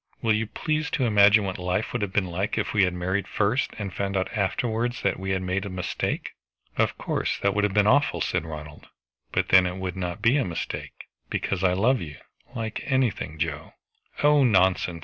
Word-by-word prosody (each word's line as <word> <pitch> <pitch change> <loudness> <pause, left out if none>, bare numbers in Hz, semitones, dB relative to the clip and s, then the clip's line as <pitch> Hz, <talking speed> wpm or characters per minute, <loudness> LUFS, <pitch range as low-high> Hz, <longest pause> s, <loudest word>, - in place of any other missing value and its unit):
Will 110 -1 +3
you 110 +1 0
please 155 +5 -2
to 130 - +1
imagine 105 -1 +6
what 95 -2 -4
life 90 +4 -1
would 120 - -1
have 100 -2 -2
been 100 -1 +1
like 95 +3 -2
if - - -1
we 100 -3 +4
had 90 - -1
married 95 +3 -1
first, 110 +7 +1
and 100 -3 -5
found 100 -1 -2
out 95 - -2
afterwards 115 +4 -1
that - - 0
we 95 0 -4
had 95 -1 0
made 95 +1 -1
a 100 - -5
mistake." 90 -1 -3 0.4
"Of - - +1
course - - -1
that 100 - +3
would 105 - +1
have 105 -1 0
been 105 -1 +4
awful," 145 +7 +3
said - - 0
Ronald. 75 -2 -9 0.4
"But - - 0
then 95 -1 +6
it 90 +1 -4
would 95 -1 -4
not 90 +1 -4
be 115 +6 +3
a 140 - +2
mistake, 85 -7 -5 0.2
because 95 -1 -2
I 90 -1 +4
love 120 +8 +2
you 75 -3 -7 0.4
like 110 -2 -4
anything, 125 - 0
Joe!" 80 -1 -3 0.5
"Oh, 145 -1 +5
nonsense! 95 -6 +2
100 Hz, 210 wpm, -25 LUFS, 90-110 Hz, 0.5 s, imagine